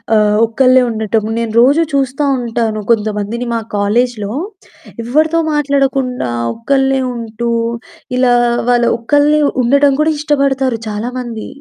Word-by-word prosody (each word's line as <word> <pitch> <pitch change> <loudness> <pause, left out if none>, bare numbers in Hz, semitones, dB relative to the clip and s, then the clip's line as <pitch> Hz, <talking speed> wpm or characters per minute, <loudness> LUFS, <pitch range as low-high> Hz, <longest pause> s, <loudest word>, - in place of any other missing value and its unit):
ఆహ్, 210 -1 +3
ఒక్కళ్ళే 255 +3 +3
ఉండటం. 220 -1 -1
నేను 230 -1 -2
రోజూ 285 +7 +4
చూస్తా 275 +1 0 0.2
ఉంటాను 225 -2 -2
కొంతమందిని 215 +2 -1
మా 230 - 0 0.2
కాలేజిలో 210 0 0 0.7
ఎవ్వరితో 310 +6 +1
మాట్లాడకుండా 270 - 0 0.3
ఒక్కళ్ళే 270 +2 +1
ఉంటూ 230 0 -4 0.7
ఇలా 255 -1 +3 0.4
వాళ్ళు 240 -1 +3
ఒక్కళ్ళే 290 +5 +2 0.2
ఉండటం 280 +3 +3
కూడా 315 +1 +2
ఇష్టపడతారు 275 -5 0
చాలా 210 +3 -4
మంది. 235 -3 -6
245 Hz, 115 wpm, -14 LUFS, 225-275 Hz, 0.7 s, రోజూ